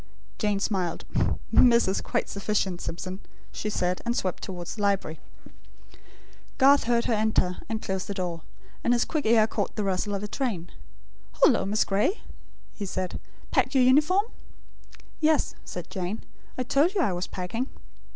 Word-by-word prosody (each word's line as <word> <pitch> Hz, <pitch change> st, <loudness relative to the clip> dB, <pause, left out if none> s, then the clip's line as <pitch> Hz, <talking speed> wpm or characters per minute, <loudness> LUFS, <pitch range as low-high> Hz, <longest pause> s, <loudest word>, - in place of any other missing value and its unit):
Jane 210 Hz, -2 st, +1 dB
smiled. 185 Hz, -4 st, -1 dB, 0.5 s
"'Miss' 235 Hz, -3 st, +6 dB
is 190 Hz, -, 0 dB
quite -, -, -1 dB
sufficient, 200 Hz, -3 st, -1 dB
Simpson," 185 Hz, +3 st, -5 dB, 0.3 s
she 210 Hz, -, -3 dB
said; 180 Hz, -3 st, -1 dB
and 235 Hz, 0 st, -1 dB
swept 185 Hz, -2 st, -2 dB
towards 175 Hz, -2 st, -5 dB
the 210 Hz, -, -6 dB
library. 195 Hz, -6 st, 0 dB, 1.4 s
Garth 280 Hz, +1 st, +6 dB
heard 235 Hz, 0 st, +2 dB
her -, -, +1 dB
enter, 215 Hz, -4 st, +1 dB
and 225 Hz, -1 st, -3 dB
close 190 Hz, -1 st, -2 dB
the 200 Hz, -, -5 dB
door; 175 Hz, -3 st, -3 dB, 0.4 s
and 240 Hz, -, +3 dB
his 240 Hz, -, +2 dB
quick 305 Hz, -7 st, -2 dB
ear 220 Hz, -1 st, +6 dB
caught -, -, -3 dB
the 210 Hz, -, -1 dB
rustle 195 Hz, +1 st, -1 dB
of 200 Hz, -, -4 dB
a -, -, -3 dB
train. 205 Hz, -8 st, -3 dB, 0.7 s
"Hullo, -, -, +5 dB
Miss 210 Hz, +2 st, +2 dB
Gray," 210 Hz, -, +1 dB, 0.5 s
he 200 Hz, -, -5 dB
said. 185 Hz, -1 st, -3 dB, 0.3 s
"Packed -, -, +1 dB
your 260 Hz, -, +6 dB
uniform?" 300 Hz, -, +4 dB, 0.9 s
"Yes," 315 Hz, -1 st, +2 dB
said -, -, -7 dB
Jane. 190 Hz, +3 st, -3 dB, 0.3 s
"I 255 Hz, -, 0 dB
told 295 Hz, -, +2 dB
you 380 Hz, -, +3 dB
I 230 Hz, -, +1 dB
was 175 Hz, +1 st, -3 dB
packing." 210 Hz, +8 st, -3 dB
210 Hz, 160 wpm, -27 LUFS, 185-240 Hz, 1.4 s, Miss